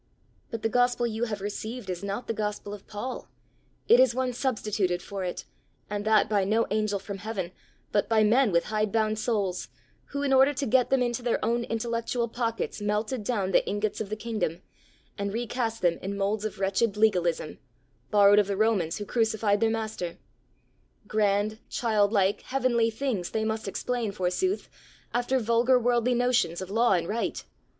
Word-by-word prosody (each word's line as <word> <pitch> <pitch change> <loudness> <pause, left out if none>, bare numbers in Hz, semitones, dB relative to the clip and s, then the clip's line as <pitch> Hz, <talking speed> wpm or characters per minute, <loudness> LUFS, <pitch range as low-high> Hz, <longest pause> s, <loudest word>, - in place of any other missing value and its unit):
"But 230 -2 -5
the - - +3
gospel 245 +1 +2
you 230 0 -1
have 210 -4 -4
received 215 +3 -5
is 180 0 -4
not 200 +5 -3
the - - -2
gospel 210 -1 -3
of 205 - -10
Paul; 235 +5 -6 0.6
it 240 - +7
is 255 -2 +5
one 255 -1 0
substituted 210 -8 -1
for 195 +1 -6
it 180 - -4 0.5
and 205 0 -2
that 220 0 +4
by 205 -2 +2
no 220 +4 +2
angel 215 -1 +1
from 195 0 -7
heaven, 200 -4 -4 0.4
but 205 - +1
by 220 -1 +4
men 235 +2 +4
with 170 -1 +3
hide 215 -1 +1
bound 215 -1 +1
souls, 205 -6 -1 0.4
who, 280 0 -4
in 275 -1 +2
order 270 +2 +5
to 280 - -1
get 250 +1 +3
them 265 -2 +3
into 240 0 -1
their 240 -1 +1
own 235 +1 0
intellectual 235 +1 -1
pockets, 230 -2 -3
melted 210 +3 -1
down 200 -4 -1
the - - +4
ingots 205 +1 -1
of 205 - -4
the 215 - -2
kingdom, 215 -6 -3 0.6
and 200 0 -2
re 235 +2 -1
cast 230 -2 -3
them 170 -1 +2
in 200 +1 -4
moulds 200 +2 -1
of 215 - -4
wretched 195 +2 +1
legalism, 180 -6 +1 0.5
borrowed 205 0 +6
of 205 - +2
the 200 -1 -2
Romans 200 -7 +1
who 205 - -5
crucified 220 -2 +1
their 225 0 +3
master. 220 -6 -3 0.9
Grand, 210 0 +1
childlike, 205 -3 +2
heavenly 245 -3 +2
things 225 -6 -2
they 220 0 -1
must 220 -1 -2
explain, 230 +3 -2
forsooth, 195 - -1 0.5
after 245 +2 +1
vulgar 235 +2 +3
worldly 245 0 +2
notions 245 -8 +1
of 190 0 -6
law 230 +1 +3
and 170 -2 0
right! 225 +4 -2
220 Hz, 180 wpm, -27 LUFS, 200-235 Hz, 0.9 s, it